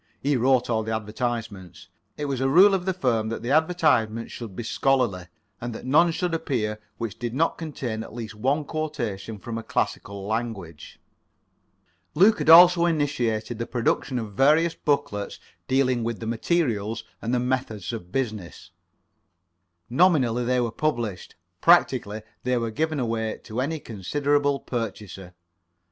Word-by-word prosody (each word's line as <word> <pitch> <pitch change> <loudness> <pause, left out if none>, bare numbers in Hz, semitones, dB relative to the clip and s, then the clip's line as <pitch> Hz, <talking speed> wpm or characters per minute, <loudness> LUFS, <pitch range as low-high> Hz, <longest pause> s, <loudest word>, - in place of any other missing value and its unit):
He 145 +1 +1
wrote 125 0 +3
all 115 -2 0
the 110 0 -2
advertisements. 110 -3 -5 0.3
It 150 - -3
was 135 -2 -2
a 135 - +2
rule 190 +8 +7
of 185 -2 0
the 190 - +1
firm 120 -10 0
that 115 0 -5
the 120 - -2
advertisements 155 -9 +2
should 110 -6 -8
be 120 - -4
[Pg - - -5
13]scholarly, 120 -10 +2 0.3
and 120 -1 -4
that - - -8
none 155 +6 +4
should 175 +1 -2
appear 110 -9 -2 0.2
which 115 -4 -5
did 120 -1 -4
not 165 +4 +1
contain 130 -8 -4
at - - -9
least 115 -1 -7
one 135 +8 0
quotation 120 -10 -4
from 115 +3 -5
a - - -8
classical 100 -2 -3
language. 110 -7 -5 1.2
Luke 205 +6 +5
had - - 0
also 175 +1 +8
initiated 120 -8 -1
the 115 - -3
production 125 +1 -1
of 110 -4 -5
various 155 +8 +4
booklets 105 -9 -2 0.3
dealing 130 -2 +2
with 115 -1 -3
the 115 - -6
materials 115 - -1 0.2
and 115 - -3
the 125 - +2
methods 125 -5 -2
of 90 -6 -7
business. 110 -8 -4 1.2
Nominally 125 -5 +3
they 125 +1 +2
were 120 -2 0
published; 120 - -3 0.3
practically 105 +1 +3 0.2
they 125 0 0
were 115 -1 -2
given 155 +4 -1
away 115 -2 -2
to 110 +3 -3
any 155 +4 -2
considerable 145 +6 0
purchaser. 100 -7 -6
120 Hz, 155 wpm, -25 LUFS, 110-145 Hz, 1.2 s, also